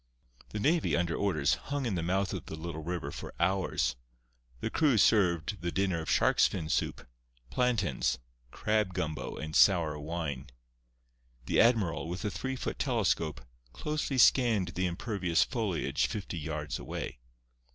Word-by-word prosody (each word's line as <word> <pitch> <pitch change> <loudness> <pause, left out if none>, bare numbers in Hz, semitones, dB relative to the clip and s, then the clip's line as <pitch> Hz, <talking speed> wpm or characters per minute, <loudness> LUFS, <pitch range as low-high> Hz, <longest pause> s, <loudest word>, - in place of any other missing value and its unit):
The 105 - -4
navy, 155 +9 +2
under 85 0 0
orders, 75 -8 +1 0.2
hung 140 -1 -1
in 115 - -1
the 85 - -1
mouth 95 +2 0
of - - -5
the - - -5
little 80 0 -6
river 85 +1 -4
for - - -8
hours. 85 -9 +1 0.6
The - - -3
crew 145 -7 +3
served 95 -2 +3
the 85 0 -2
dinner 95 -3 0
of 80 - -6
shark's - - +4
fin 80 - -4
soup, - - -1 0.5
plantains, 110 - +1 0.3
crab 105 - 0
gumbo 80 -1 -3
and 80 0 -5
sour 80 -6 +4
wine. 75 -3 -4 1.0
The - - +3
admiral, 105 -10 +2
with 90 +5 -4
a 105 - 0
three 130 +9 -3
foot 130 - -4
telescope, 90 - 0 0.3
closely 150 -3 -2
scanned 115 -8 +5
the 90 +1 -1
impervious 90 -1 +1
foliage 110 -8 -1
fifty 100 -5 -5
yards 75 0 -4
away. - - -5
90 Hz, 150 wpm, -30 LUFS, 80-110 Hz, 1.0 s, scanned